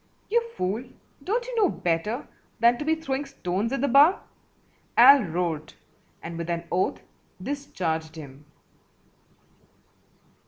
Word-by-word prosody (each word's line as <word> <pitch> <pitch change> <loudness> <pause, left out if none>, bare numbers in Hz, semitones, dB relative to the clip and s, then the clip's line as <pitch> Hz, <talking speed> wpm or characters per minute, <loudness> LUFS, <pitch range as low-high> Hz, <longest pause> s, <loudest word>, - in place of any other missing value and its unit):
"You 470 +1 +4 0.2
fool, 200 +6 -1 0.4
don't 465 - -1
you - - -6
know 410 -5 +4
better 180 - -2 0.3
than 235 +1 +4
to 295 - -4
be 320 +1 +2
throwing 285 -3 -3
stones 215 -5 -3
at 275 - -1
the 280 - +2
bar?" 285 +8 +5 0.7
Al 280 -1 +9
roared, 165 -2 -3 0.5
and 165 0 -6
with 170 0 -4
an 170 0 -2
oath 180 +2 0 0.4
discharged 175 - -3
him. 145 -2 -11
220 Hz, 125 wpm, -26 LUFS, 170-285 Hz, 0.7 s, Al